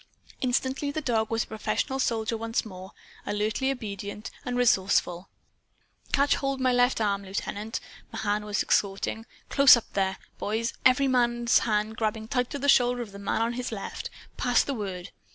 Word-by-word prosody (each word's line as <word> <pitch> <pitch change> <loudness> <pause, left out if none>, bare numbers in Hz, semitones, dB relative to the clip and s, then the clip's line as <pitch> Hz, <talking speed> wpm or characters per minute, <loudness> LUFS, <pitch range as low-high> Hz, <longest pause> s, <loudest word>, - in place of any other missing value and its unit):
Instantly 260 +2 0
the 285 - -2
dog 230 -6 0
was 225 -1 0
a - - -14
professional 265 +5 -2
soldier 225 -3 0
once 225 +1 -2
more 190 -2 -9 0.3
alertly 215 +6 -1
obedient 210 -4 -5
and 245 -1 -2
resourceful. 190 -6 +2 0.8
"Catch 285 0 +3
hold 275 -1 -2
my 255 -1 +2
left 245 0 +3
arm, 200 -2 0
Lieutenant!" 205 +3 -4 0.3
Mahan 210 -2 -1
was 210 0 -1
exhorting. 200 +3 0 0.2
"Close 275 -3 +8
up, 235 - -8
there, 190 -1 0 0.2
boys 225 +4 -1
every 260 +2 +3
man's 240 -2 +3
hand 215 +1 0
grabbing 220 0 -2
tight 250 -2 0
to - - -4
the 285 +1 -2
shoulder 245 -2 +4
of 215 - -12
the 200 - -10
man 200 +3 0
on 230 +1 -1
his 250 0 -4
left! 200 -3 -5 0.3
Pass 245 -1 +3
the 280 - -3
word. 195 -5 -5
225 Hz, 170 wpm, -27 LUFS, 205-250 Hz, 0.8 s, Close